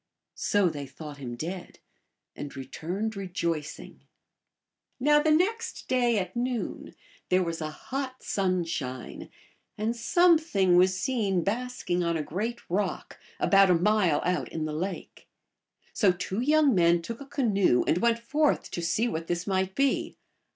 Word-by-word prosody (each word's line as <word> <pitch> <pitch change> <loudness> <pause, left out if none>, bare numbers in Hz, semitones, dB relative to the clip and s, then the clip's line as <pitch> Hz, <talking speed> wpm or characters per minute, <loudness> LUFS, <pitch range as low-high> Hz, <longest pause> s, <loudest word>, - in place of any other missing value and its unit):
So 205 -2 +2
they 145 -4 -4
thought 150 0 -9
him 120 -3 -6
dead, 175 +7 -6 0.6
and 140 -1 -7
returned 185 +11 -4
re 195 -1 -5
joicing. 165 -4 -4 1.0
Now 295 +3 +4
the 310 - +1
next 405 +9 0
day 245 -3 +2
at 185 0 -3
noon 245 -1 -3 0.3
there 185 0 +3
was 165 -1 -4
a 155 - -2
hot 260 - -6
sun 185 -3 0
shine, 130 -7 -5 0.5
and 220 +3 -1
something 310 - +3
was 185 +1 +4
seen 205 -9 0
basking 220 -4 -2
on 170 -1 0
a 155 - -2
great 220 +10 -4
rock, 190 +2 -2 0.2
about 195 -1 +5
a 180 - +5
mile 180 -3 +2
out 180 0 0
in 160 -1 -3
the 155 - -4
lake. 185 +5 -5 0.7
So 200 -4 +4
two 190 +3 -4
young 295 0 +4
men 170 -2 +3
took 230 +7 -6
a 275 - -9
canoe 200 - +2
and 170 - +2
went 235 +1 +3
forth 290 +6 0
to 175 - -3
see 190 +8 +1
what 165 -6 -4
this 175 0 -2
might 190 -1 -1
be. 275 0 0
190 Hz, 155 wpm, -27 LUFS, 170-240 Hz, 1.0 s, about